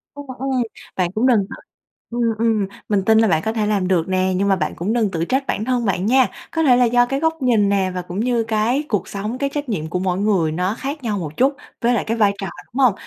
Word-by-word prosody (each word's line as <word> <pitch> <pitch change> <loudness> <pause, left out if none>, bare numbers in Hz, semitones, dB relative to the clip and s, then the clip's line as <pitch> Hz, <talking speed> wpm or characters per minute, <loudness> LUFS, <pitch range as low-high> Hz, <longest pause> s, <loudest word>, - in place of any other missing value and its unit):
Ừm, 285 0 -8
ừm. 265 -1 0 0.3
Bạn 180 -2 0
cũng 220 +6 +1
đừng 240 -4 +5
tự - - -7 0.6
ừm, 230 -2 0
ừm, 220 -3 +1 0.2
mình 200 -2 +2
tin 220 +1 +5
là 225 - +4
bạn 160 -5 +2
có 220 - 0
thể 220 -2 0
làm 200 -3 +1
được 180 -3 +1
nè 185 0 +1
nhưng 195 +2 +1
mà 195 - +4
bạn 155 -5 -2
cũng 190 +6 -2
đừng 225 -4 +1
tự 165 -2 -1
trách 270 +7 -1
bản 215 - -1
thân 250 -1 0
bạn 190 -2 0
nha. 255 +3 +4 0.2
Có 325 - 0
thể 260 -5 +6
là 250 - +5
do 245 +1 +4
cái 270 +3 -2
góc 320 0 0
nhìn 225 -6 +3
nè 195 -2 +1
và 180 - -2
cũng 180 +2 -6
như 235 0 +1
cái 225 +5 0
cuộc 210 -8 -1
sống, 210 +5 -4
cái 280 +1 -1
trách 290 -1 -4
nhiệm 160 -8 -2
của 180 +3 -2
mỗi 180 -1 -1
người 195 -6 +2
nó 180 +6 -1
khác 280 +3 -5
nhau 215 -3 -1
một 155 -3 -6
chút 270 +3 +3 0.3
với 240 0 +3
lại 235 - +1
cái 225 +1 -1
vai 205 -3 +3
trò, 195 - -4 0.3
đúng 260 - -4
hông? 245 -5 +5
220 Hz, 275 wpm, -20 LUFS, 190-245 Hz, 0.6 s, thể